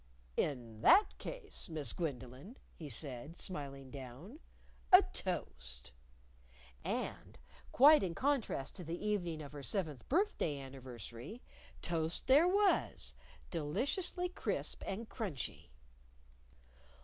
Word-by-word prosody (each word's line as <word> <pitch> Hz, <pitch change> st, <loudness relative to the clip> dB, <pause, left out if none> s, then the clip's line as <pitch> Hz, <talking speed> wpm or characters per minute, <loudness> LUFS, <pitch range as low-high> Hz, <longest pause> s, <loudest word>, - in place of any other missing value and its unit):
"In 120 Hz, -6 st, -2 dB
that 400 Hz, +4 st, +7 dB
case, -, -, -5 dB
Miss 155 Hz, -3 st, -2 dB
Gwendolyn," 140 Hz, -, -5 dB, 0.2 s
he 155 Hz, -3 st, -8 dB
said, 140 Hz, +5 st, -2 dB
smiling 140 Hz, -7 st, -5 dB
down, 140 Hz, -, -9 dB, 0.5 s
"a 370 Hz, +2 st, +11 dB
toast!" 65 Hz, -, -3 dB, 0.9 s
And -, -, -3 dB, 0.3 s
quite 295 Hz, +4 st, +8 dB
in 175 Hz, -3 st, -1 dB
contrast 260 Hz, -, 0 dB
to 180 Hz, -, -6 dB
the 165 Hz, +1 st, -3 dB
evening 175 Hz, -7 st, -1 dB
of 145 Hz, -, -9 dB
her 145 Hz, -1 st, -7 dB
seventh 155 Hz, -3 st, -2 dB
birthday 290 Hz, -, +1 dB
anniversary 130 Hz, -, -8 dB, 0.4 s
toast 165 Hz, -1 st, -1 dB
there 285 Hz, +6 st, +7 dB
was, 400 Hz, +1 st, +2 dB, 0.4 s
deliciously 275 Hz, -, 0 dB
crisp 360 Hz, -, -3 dB
and 220 Hz, +4 st, -3 dB
crunchy! 185 Hz, -, -4 dB
165 Hz, 105 wpm, -36 LUFS, -, 0.9 s, a